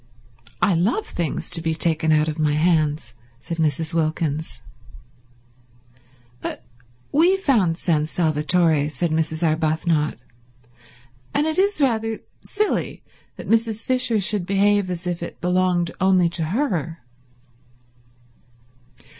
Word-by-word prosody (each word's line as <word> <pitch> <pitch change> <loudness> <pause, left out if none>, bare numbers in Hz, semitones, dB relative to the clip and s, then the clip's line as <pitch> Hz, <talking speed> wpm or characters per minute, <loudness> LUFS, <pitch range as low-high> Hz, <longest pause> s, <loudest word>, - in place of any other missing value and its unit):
"I 195 - +4
love 200 - +1
things 170 -2 -3
to 170 -2 +1
be 160 -1 -1
taken 160 -1 +1
out 155 0 +3
of 155 0 -4
my 150 -1 +2
hands," 155 -5 +1 0.3
said 170 - -6
Mrs. 160 +1 0
Wilkins. 155 -1 -2 1.8
"But - - -5 0.5
we 345 +6 +4
found 220 - +1
San 155 -4 0
Salvatore," 155 -1 +2
said 155 +3 -2
Mrs. 160 +1 -1
Arbuthnot, 155 0 0 1.2
"and 295 - +2
it 315 +3 0
is 400 -1 +2
rather 225 -5 +1 0.3
silly 425 0 -2 0.3
that - - -9
Mrs. 225 -1 +1
Fisher 255 -3 +1
should 195 -2 +1
behave 200 0 +2
as 180 0 -5
if 175 -1 -3
it 170 - -7
belonged 180 -1 +1
only 185 -2 +4
to 165 -1 -3
her." 170 - -2
170 Hz, 120 wpm, -22 LUFS, 155-205 Hz, 1.8 s, I